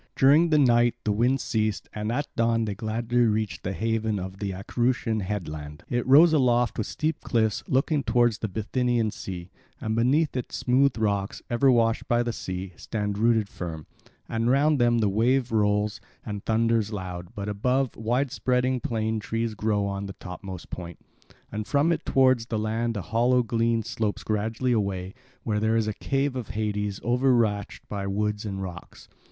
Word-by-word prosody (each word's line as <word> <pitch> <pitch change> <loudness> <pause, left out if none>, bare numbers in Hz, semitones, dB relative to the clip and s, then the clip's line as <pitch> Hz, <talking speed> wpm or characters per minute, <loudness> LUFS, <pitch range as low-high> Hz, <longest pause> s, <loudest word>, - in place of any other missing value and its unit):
During 150 +6 +5
the 155 - +4
night 120 -4 +4
the 105 - +1
wind 120 +6 +2
ceased 110 -2 -1
and 105 +1 -3
at 145 +5 -1
dawn 115 -1 +2
they 105 - -2
gladly 115 +3 -2
reached 110 -5 +1
the 95 - -3
haven 110 0 -1
of 95 +1 -6
the 100 - -2
Acherusian 115 +3 -1
headland. 75 -7 -5
It 120 0 0
rises 155 +5 +7
aloft 125 -5 +2
with 110 - -1
steep 155 +1 -2
cliffs, 110 -3 +1
looking 140 +3 +1
towards 120 -3 +2
the 110 - -2
Bithynian 115 +2 0
sea; 90 -3 -7 0.3
and 110 0 -2
beneath 135 +7 +2
it 125 - -3
smooth 130 +1 +2
rocks, 100 -3 -1
ever 135 +3 +4
washed 115 -2 +2
by 120 0 +2
the 120 -1 -2
sea, 95 -2 -5
stand 105 -2 -3
rooted 110 -2 +3
firm; 80 -6 -6 0.4
and 115 +1 0
round 145 +2 +3
them 120 -1 +3
the 110 -2 +2
wave 120 +5 +2
rolls 105 -1 +1 0.2
and 105 -2 -5
thunders 115 -1 +1
loud, 90 0 -6
but 100 -2 -4
above, 125 +6 0
wide 120 +4 0
spreading 125 0 +1
plane 110 -1 -1
trees 115 +1 -2
grow 105 -1 0
on 100 0 -3
the 95 - -7
topmost 90 -1 -9
point. 85 -2 -7 0.5
And 105 0 -4
from 145 +4 +2
it 165 - -2
towards 130 -3 +3
the 115 - -2
land 110 +1 -1
a 100 - -4
hollow 120 +3 +2
glen 115 0 +1
slopes 105 -1 -2
gradually 110 +4 -1
away, 100 -4 -1 0.3
where 105 -2 0
there 110 +1 +1
is 110 -1 +1
a 110 - -1
cave 135 +4 -1
of 125 -5 -4
Hades 105 -2 -2
overarched 120 -4 +1
by 100 -1 -4
wood 105 +1 -1
and 95 -1 -4
rocks. 90 -2 -9
110 Hz, 175 wpm, -26 LUFS, 105-120 Hz, 0.5 s, rises